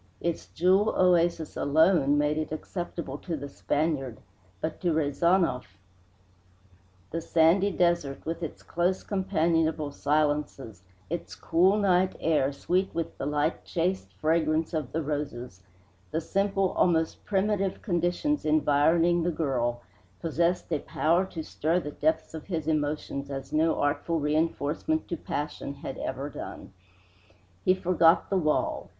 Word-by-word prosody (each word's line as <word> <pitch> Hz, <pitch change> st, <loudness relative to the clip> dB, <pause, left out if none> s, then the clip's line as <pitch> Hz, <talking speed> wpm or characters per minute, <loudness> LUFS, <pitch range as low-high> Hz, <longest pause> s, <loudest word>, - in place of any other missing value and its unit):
Its 170 Hz, -1 st, -3 dB
jewel 190 Hz, +5 st, +2 dB
oasis 170 Hz, -3 st, +2 dB
alone 145 Hz, -1 st, +3 dB
made 150 Hz, +1 st, +2 dB
it 155 Hz, -1 st, -3 dB
acceptable 155 Hz, -3 st, -5 dB
to 170 Hz, -4 st, -4 dB
the 140 Hz, 0 st, -6 dB
Spaniard, 140 Hz, -4 st, -1 dB, 0.4 s
but 160 Hz, 0 st, -4 dB
to 175 Hz, -3 st, +1 dB
Rezanov 155 Hz, -, +1 dB, 1.3 s
the 165 Hz, -, -2 dB
sandy 170 Hz, +5 st, +3 dB
desert, 170 Hz, -7 st, 0 dB
with 165 Hz, +2 st, -3 dB
its 165 Hz, -, -6 dB
close 180 Hz, +2 st, 0 dB
companionable 165 Hz, -5 st, 0 dB
silences, 145 Hz, -, -1 dB, 0.3 s
its 170 Hz, -, -4 dB
cool 180 Hz, +5 st, +3 dB
night 185 Hz, -2 st, +2 dB
air 150 Hz, -4 st, +2 dB
sweet 185 Hz, +7 st, 0 dB
with 165 Hz, -1 st, -3 dB
the 135 Hz, -, -2 dB
light 150 Hz, +2 st, 0 dB
chaste 175 Hz, -, -2 dB
fragrance 160 Hz, -, +1 dB
of 155 Hz, -6 st, -2 dB
the 160 Hz, +1 st, -2 dB
roses, 135 Hz, -9 st, -4 dB, 0.5 s
the 160 Hz, -, -1 dB
simple, 195 Hz, +2 st, 0 dB
almost 165 Hz, -2 st, +1 dB
primitive, 195 Hz, -1 st, 0 dB
conditions 180 Hz, -, 0 dB
environing 155 Hz, +3 st, +3 dB
the 170 Hz, -, +1 dB
girl, 125 Hz, -7 st, -1 dB, 0.4 s
possessed 170 Hz, +1 st, 0 dB
a 150 Hz, -, +1 dB
power 170 Hz, +7 st, +1 dB
to 165 Hz, -4 st, -6 dB
stir 160 Hz, +3 st, 0 dB
the 150 Hz, -4 st, -6 dB
depths 160 Hz, +2 st, 0 dB
of 160 Hz, -2 st, -8 dB
his 160 Hz, -5 st, -3 dB
emotions 145 Hz, -2 st, -2 dB
as 135 Hz, -1 st, -6 dB
no 160 Hz, +1 st, +3 dB
artful 145 Hz, +3 st, 0 dB
reinforcement 155 Hz, -, 0 dB
to 170 Hz, -, -2 dB
passion 145 Hz, -2 st, -4 dB
had 135 Hz, -1 st, -7 dB
ever 135 Hz, +2 st, -3 dB
done. 135 Hz, -, -8 dB, 0.9 s
He 185 Hz, -, +4 dB
forgot 175 Hz, -2 st, +3 dB
the 195 Hz, -, +3 dB
wall. 155 Hz, -3 st, 0 dB
160 Hz, 135 wpm, -27 LUFS, 145-175 Hz, 1.3 s, He